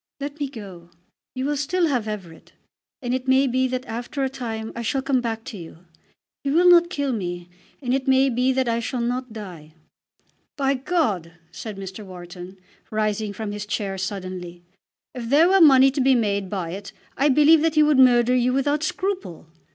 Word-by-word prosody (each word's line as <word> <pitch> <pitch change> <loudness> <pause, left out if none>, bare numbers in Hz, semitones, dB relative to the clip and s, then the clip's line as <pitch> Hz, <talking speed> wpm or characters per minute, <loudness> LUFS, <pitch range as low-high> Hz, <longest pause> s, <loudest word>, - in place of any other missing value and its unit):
Let 285 +2 -6
me 285 -2 -2
go. 195 -9 -11 0.5
You 255 +1 -2
will 295 +1 0
still 335 +6 0
have 250 -8 0
Everett. 190 -6 -8 0.5
And 245 0 -1
it 260 0 -3
may 265 +1 +4
be 260 0 +1
that 255 0 -4
after 245 +5 -4
a 265 - 0
time 225 -4 -5
I 235 - -4
shall 265 +4 -1
come 270 -2 +1
back 225 -2 -3
to 210 - -8
you. 165 +1 -12 0.6
He 280 - -1
will 340 +5 +4
not 345 -1 +6
kill 285 -6 -2
me, 175 -4 -5 0.3
and 245 0 0
it 265 0 -1
may 265 +1 +4
be 250 +2 +1
that 260 -1 0
I 230 0 +1
shall 245 +2 -3
not 250 +1 -2
die." 175 -8 -10 0.8
"By 275 -1 +2
God!" 255 - -1 0.2
said 210 +4 -7
Mr. 195 +2 -7
Wharton, 180 0 -10 0.3
rising 215 -1 -1
from 205 +1 -5
his 205 0 -6
chair 200 -3 -2
suddenly, 185 -2 -6 0.5
"if 235 -3 -6
there 300 +5 +5
were 385 0 +4
money 270 -3 +7
to 275 - -1
be 265 0 +4
made 200 -4 0
by 180 -4 -3
it, 195 +2 -8 0.2
I 280 +3 +2
believe 300 +3 +6
that 320 -1 +1
he 305 - +6
would 300 -3 +3
murder 245 -1 +5
you 250 0 +2
without 285 +3 +1
scruple." 360 - -3
245 Hz, 195 wpm, -23 LUFS, 200-275 Hz, 0.8 s, money